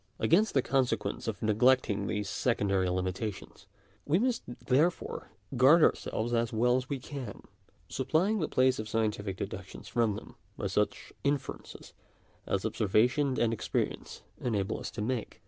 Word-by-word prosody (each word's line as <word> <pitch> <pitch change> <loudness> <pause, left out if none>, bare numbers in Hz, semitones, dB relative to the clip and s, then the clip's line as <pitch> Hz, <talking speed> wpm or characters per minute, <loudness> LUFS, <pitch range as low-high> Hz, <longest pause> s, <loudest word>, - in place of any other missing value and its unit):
Against 205 +4 +3
the 135 - +4
conse 130 0 +2
quence - - -5
of - - -3
neglecting 110 -2 +3
these 105 -1 -2
secondary 100 -4 +1
limitations, 95 +3 -4 0.4
we 150 +4 +2
must 245 +3 +1
therefore 130 +8 0 0.3
guard 140 +7 +6
ourselves 120 +2 +1
as 115 -1 +1
well 120 +2 +3
as 130 0 -2
we 140 - -1
can; 130 -4 -7 0.4
supplying 175 - +1
the 160 - 0
place 130 -1 +2
of 110 0 -5
scientific 105 -3 -1
deductions 95 -1 -7
from 115 -3 +1
them, - - -9 0.2
by - - -4
such - - -1
inferences 140 -1 -3 0.5
as 100 +1 -1
observation 120 +6 +2
and 115 -1 +2
experience 115 - -3 0.2
enable 105 -3 -1
us - - -5
to 105 - -5
make. 125 0 -3
120 Hz, 145 wpm, -30 LUFS, 105-135 Hz, 0.5 s, guard